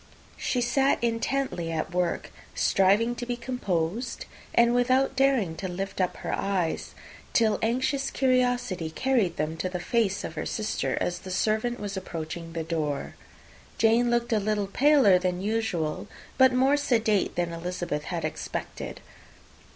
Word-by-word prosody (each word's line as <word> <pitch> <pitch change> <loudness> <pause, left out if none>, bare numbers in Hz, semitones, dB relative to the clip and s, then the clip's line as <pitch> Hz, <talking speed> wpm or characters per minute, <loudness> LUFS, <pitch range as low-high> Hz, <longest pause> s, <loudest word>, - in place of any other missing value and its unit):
She 250 - -1
sat 270 +3 +2
intently 230 -6 -1
at 160 +1 -3
work, 180 -1 -1 0.2
striving 205 +5 +3
to - - -4
be 245 - -1
composed, 230 -3 -2 0.3
and 235 0 +4
without 255 +2 +2
daring 260 -11 +2
to 190 - -3
lift 190 +2 -3
up 180 - 0
her - - -4
eyes, 185 -5 -1 0.4
till 220 -2 +3
anxious 260 +4 0
curiosity 245 -9 +1
carried 220 -2 +1
them 155 +2 -2
to 185 - -2
the 180 -1 -4
face 205 0 0
of - - -5
her 155 - -4
sister 215 0 -2
as 175 0 -1
the 190 - -10
servant 220 +5 0
was 205 -1 -4
approaching 165 -2 -6
the 165 -1 -2
door. 155 -3 -2 0.6
Jane 230 +2 +4
looked 240 0 +1
a 215 - +3
little 210 0 0
paler 255 -3 +5
than 180 -1 -1
usual, 200 -6 -1 0.3
but 260 -1 +6
more 265 +3 +3
sedate 225 -7 +1
than 175 -1 -1
Elizabeth 170 -3 -3
had - - -3
expected. - - -5
210 Hz, 150 wpm, -27 LUFS, 175-245 Hz, 0.6 s, but